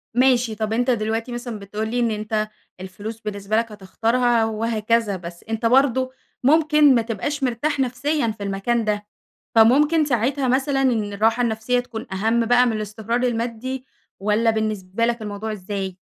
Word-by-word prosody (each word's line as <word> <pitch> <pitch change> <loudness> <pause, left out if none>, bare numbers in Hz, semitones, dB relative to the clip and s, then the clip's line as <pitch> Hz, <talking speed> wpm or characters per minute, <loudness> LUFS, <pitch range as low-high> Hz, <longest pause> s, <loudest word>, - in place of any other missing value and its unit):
ماشي 250 -3 +3
طب 215 0 -2
أنتَ 245 +3 +1
دلوقتي 225 +1 -1
مثلًا 240 -3 -5
بتقول 210 +2 -4
لي 245 +2 -1
إن 235 -2 +1
أنتَ 215 0 -2 0.3
الفلوس 205 +4 -7
بالنسبة 210 0 -2
لَك 230 0 0
هتختارها 230 +4 +1
وهكذا، 225 -1 0
بس 170 -1 -10
أنتَ 225 +1 -2
برضو 260 +1 +3 0.3
ممكن 300 -1 +5
ما 235 - +3
تبقاش 240 +6 -3
مرتاح 270 +4 0
نفسيًا 265 +2 0
في 200 - -6
المكان 200 +4 -1
ده، 210 -1 -1 0.5
فممكن 290 +8 +5
ساعتها 260 +1 0
مثلًا 270 +2 +1
إن 220 -6 +1
الراحة 225 +4 +2
النفسية 235 +2 0
تكون 235 -2 -7
أهم 225 +4 +1
بقى 245 +1 +5
من 240 - +1
الاستقرار 220 +2 -2
المادي، 245 +2 -2 0.4
والّا 215 +3 +2
بالنسبة 215 -1 -1
لَك 235 -1 -1
الموضوع 210 +1 -4
إزاي؟ 195 -2 -5
230 Hz, 155 wpm, -22 LUFS, 215-250 Hz, 0.5 s, ممكن